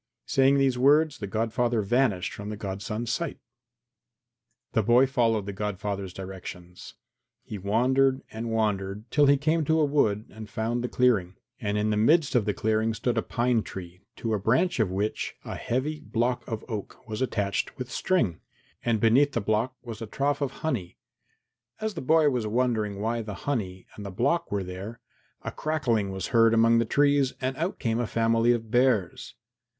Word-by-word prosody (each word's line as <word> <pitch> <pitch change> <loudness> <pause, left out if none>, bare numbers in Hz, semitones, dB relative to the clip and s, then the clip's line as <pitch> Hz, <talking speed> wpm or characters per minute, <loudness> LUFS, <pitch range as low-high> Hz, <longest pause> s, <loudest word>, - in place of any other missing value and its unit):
Saying 135 +1 +4
these 135 -3 +2
words 150 +3 +4
the 100 - -4
godfather 115 +2 0
vanished 110 -4 +1
from 100 +1 -7
the 105 - -5
godson's 105 +3 -4
sight. 170 +6 -2
IV - - -35 1.3
The 110 - +2
boy 120 +5 +5
followed 115 -5 +1
the 100 - -5
godfather's 100 -1 -3
directions. 90 -1 -9 0.5
He 105 - -7
wandered 130 +7 +2
and 115 +1 -5
wandered 105 -2 -1
till 145 -1 +4
he 140 0 +5
came 155 +3 +1
to 160 +2 +2
a 155 - +4
wood 110 -8 +1
and 110 +1 -10
found 115 +3 -2
the - - 0
clearing, 105 -8 +2 0.2
and 105 -1 -1
in 105 +1 +1
the 105 - +1
midst 150 +8 +3
of 120 -5 +3
the 105 - 0
clearing 110 +1 0
stood 120 +1 -1
a 115 - +2
pine 120 0 +1
tree 90 -2 -9
to 115 -1 -2
a 105 - +1
branch 125 - +1
of 110 -4 +2
which 100 +4 -2
a - - -5
heavy 145 +6 -2
block 125 -3 -1
of 110 -3 -5
oak 110 -3 -7
was 110 +1 -4
attached 100 -6 -1
with 125 0 -6
string, 120 - 0 0.4
and 115 -2 +1
beneath 130 +6 +4
the - - +1
block 110 +4 0
was 115 -2 -8
a 115 - -5
trough 140 +5 -1
of 140 - +1 0.2
honey. 110 - -2 0.8
As 220 -1 -2
the 165 - -5
boy 155 +3 +4
was 120 -4 -1
wondering 110 -3 0
why 115 +2 -1
the 105 -2 -6
honey 95 -10 -2
and 105 - -8
the 100 - -5
block 140 - 0
were 100 -1 -1
there, 95 +5 -7 0.4
a - - -4
crackling 125 -10 0
was 95 -1 -4
heard 115 -1 +5
among 115 +1 +5
the 115 - +2
trees 140 +1 +3
and 130 0 -2
out 170 +4 -2
came 115 -1 -1
a 120 - -1
family 115 +1 +2
of 115 -2 -2
bears. 120 -7 +1
115 Hz, 185 wpm, -27 LUFS, 105-130 Hz, 1.3 s, boy